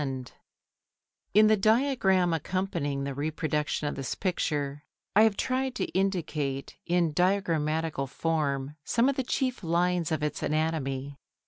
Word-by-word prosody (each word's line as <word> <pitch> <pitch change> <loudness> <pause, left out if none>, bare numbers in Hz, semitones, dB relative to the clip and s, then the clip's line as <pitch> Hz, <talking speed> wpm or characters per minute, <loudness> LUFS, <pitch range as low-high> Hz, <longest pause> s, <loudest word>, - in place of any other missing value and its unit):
Photo 140 -2 -1
Hollyer] 130 -1 -7 1.0
In 215 +1 +8
the 215 0 +5
diagram 205 -5 +3
accompanying 165 -5 -2
the 140 0 -3
reproduction 150 +1 -1
of - - -2
this 135 -2 -4
picture 145 -6 -2 0.3
I 210 - +7
have 220 -2 +4
tried 260 0 -1
to - - -1
indicate 160 -8 -1
in 170 -2 +2
diagrammatical 160 -5 +1
form 145 -1 -1
some 235 - +2
of 275 - 0
the 265 - 0
chief 255 -2 -1
lines 175 0 +1
of 155 -1 -1
its 150 - -2
anatomy. 140 -3 -1
160 Hz, 140 wpm, -28 LUFS, 145-195 Hz, 1.0 s, In